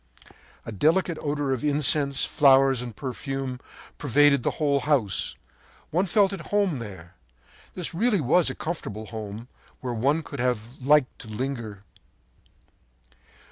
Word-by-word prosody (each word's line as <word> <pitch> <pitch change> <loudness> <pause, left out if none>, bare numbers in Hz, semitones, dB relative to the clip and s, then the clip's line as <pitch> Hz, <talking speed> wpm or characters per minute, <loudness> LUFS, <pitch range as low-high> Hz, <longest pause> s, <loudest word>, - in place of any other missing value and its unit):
“A - - -6
delicate 160 - +1
odor 145 -2 -1
of 130 - -4
incense, 145 -1 +2
flowers 135 -2 +4
and 120 -3 -7
perfume 135 0 -4 0.4
pervaded 145 0 +4
the - - 0
whole 140 -2 +2
house. 130 -10 0 0.6
One 180 +5 +1
felt 200 +1 +3
at 170 -5 -7
home 200 -9 +1
there. 95 -6 -9 0.6
This 180 -1 -4
really 210 +3 +2
was 155 +5 +3
a - - -5
comfortable 110 - -5
home, 110 +1 -7 0.3
where 125 -3 -4
one 140 +8 +1
would 140 - -6
have 125 0 -2
liked 145 0 +3
to 115 - -10
linger. 110 -3 -5
135 Hz, 135 wpm, -25 LUFS, 120-150 Hz, 0.6 s, flowers